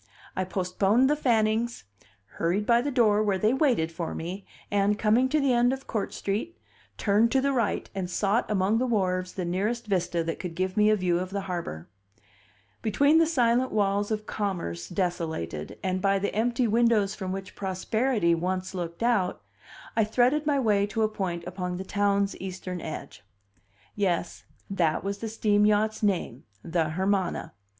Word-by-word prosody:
I 185 - -1
postponed 195 +6 +2
the - - +3
Fannings, 230 - +1 0.6
hurried 180 +5 +1
by 235 +1 +4
the 285 - -2
door 220 -6 +3
where 205 -3 +1
they 215 +5 +2
waited 255 - +2
for 165 0 -4
me, 185 +4 -6 0.2
and, 205 0 +2
coming 225 +5 +3
to 305 +3 +2
the 275 -3 +2
end 240 +1 +4
of 270 0 -5
Court 215 -3 -2
Street, 215 +13 -3 0.4
turned 215 +3 +3
to 270 - +4
the 280 +1 +1
right 235 -6 0
and 190 -3 -3
sought 200 +5 0
among 205 +2 +2
the 255 - 0
wharves 185 -5 0
the 185 - -3
nearest 210 +7 -1
vista 180 -4 0
that 165 0 -4
could 175 -3 -5
give 185 +2 -1
me 210 0 +4
a 215 - +5
view 180 -3 +1
of 185 0 -4
the 200 +1 -3
harbor. 170 - -5 0.9
Between 285 +9 +4
the 330 - +4
silent 250 -4 +2
walls 205 -1 +1
of 215 -1 -2
commerce 170 - -3
desolated, 160 - -3
and 185 0 -1
by 195 0 +3
the 200 +1 -2
empty 240 +3 +1
windows 225 -3 +3
from 190 -3 -5
which 190 0 -6
Prosperity 200 +1 0
once 185 +3 -2
looked 175 +2 -4
out, 220 -7 +1 0.5
I 225 - +4
threaded 250 +7 +2
my 290 -2 +3
way 205 -5 +2
to 220 +1 -1
a - - +4
point 185 -5 -3
upon 180 0 -4
the 190 - -5
town's 200 0 +1
eastern 185 -1 -5
edge. 155 -8 -7 0.7
Yes, 180 -4 -1 0.2
that 170 -5 0
was 200 +1 -3
the 225 - -4
steam 210 -1 +2
yacht's 215 +1 +2
name: 185 - -1 0.2
the 165 -2 0
Hermana. 190 - -1
200 Hz, 175 wpm, -27 LUFS, 180-225 Hz, 0.9 s, a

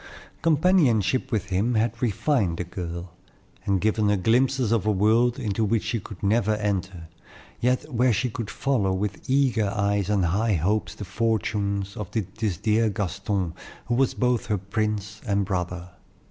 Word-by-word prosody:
Companionship 150 - +3
with 105 -6 -1
him 110 +6 +1
had 115 +2 0
refined 110 - +1
the - - -2
girl, 85 -1 -6 0.5
and 100 -1 +2
given 110 +1 +1
her 105 - +3
glimpses 125 +4 +2
of 110 -3 +1
a - - +4
world 110 +5 +3
into 110 -4 -1
which 110 +1 +1
she 110 +1 -1
could 100 -1 -11
never 110 +1 +2
enter, 95 -5 -3 0.5
yet 125 +4 0
where 125 +2 +3
she 115 +4 +1
could 115 -2 -5
follow 105 -9 0
with 100 +5 -4
eager 125 -7 +2
eyes 100 -1 0
and 100 -4 +2
high 100 +5 +1
hopes 100 +7 0
the 105 - -7
fortunes 100 -1 -1
of 105 -6 -5
this 105 -2 -2
dear 110 +3 +2
Gaston, 95 -2 -2 0.3
who 120 - -1
was 130 +1 +2
both 125 -2 +1
her 105 - +1
prince 105 +1 -3
and 100 -1 +1
brother. 90 -2 -3
105 Hz, 160 wpm, -25 LUFS, 95-115 Hz, 0.5 s, a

